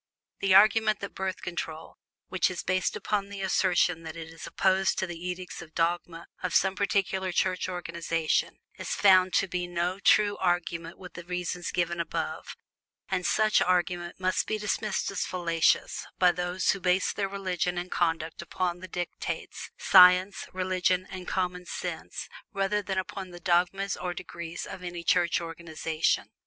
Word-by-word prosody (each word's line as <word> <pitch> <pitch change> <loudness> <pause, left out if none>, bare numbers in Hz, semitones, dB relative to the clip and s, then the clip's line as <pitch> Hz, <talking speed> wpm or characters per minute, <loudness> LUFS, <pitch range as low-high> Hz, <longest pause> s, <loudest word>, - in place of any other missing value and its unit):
The 195 -1 +3
argument 215 +1 +5
that 200 - -6
Birth 190 -1 -4
Control 165 -2 -5 0.3
which 185 -1 +1
is 185 - -5
based 185 0 0
upon 200 -1 -1
the 200 -1 -6
assertion 180 -3 +2
that 160 -1 -8
it 165 -1 -7
is 165 -2 -9
opposed 190 0 +2
to - - 0
the 175 0 -6
edicts 180 0 -5
or 170 - -9
dogmas 170 +1 -2 0.2
of 185 - -2
some 190 0 +3
particular 190 -1 0
Church 185 +1 0
organization, 170 -2 -1 0.2
is - - -3
found 185 -2 +5
to 195 - +3
be 180 -1 -3
no 175 +2 -1
true 205 +1 +4
argument 175 -2 -1
for 185 -1 -10
the 175 - -10
reasons 180 0 -3
given 170 -1 -1
above; 170 - -4 0.5
and 185 -2 0
such 215 0 +3
argument 175 -1 0
must 185 0 0
be 215 - 0
dismissed 210 0 -1
as 195 - -1
fallacious 170 -2 +1
by 180 -1 +5
those 180 +1 0
who 195 - -3
base 185 +1 +2
their 195 -1 -2
judgments 190 -3 -2
and 180 0 -3
conduct 165 -2 -1
upon 175 +1 -2
the 185 - -8
dictates 175 0 -5
of - - -12
science, 185 +1 +7
reason, 185 0 0
and 185 -1 -7
common 180 -1 -2
sense, - - -5 0.3
rather 195 +1 0
than 190 -1 -3
upon 190 0 -4
the 175 0 -10
dogmas 180 +3 +1
or 180 -1 -4
decrees 170 -1 -6
of 190 - -8
any 175 -1 -6
Church 175 0 +3
organization. 165 -1 -2
180 Hz, 165 wpm, -28 LUFS, 175-190 Hz, 0.5 s, science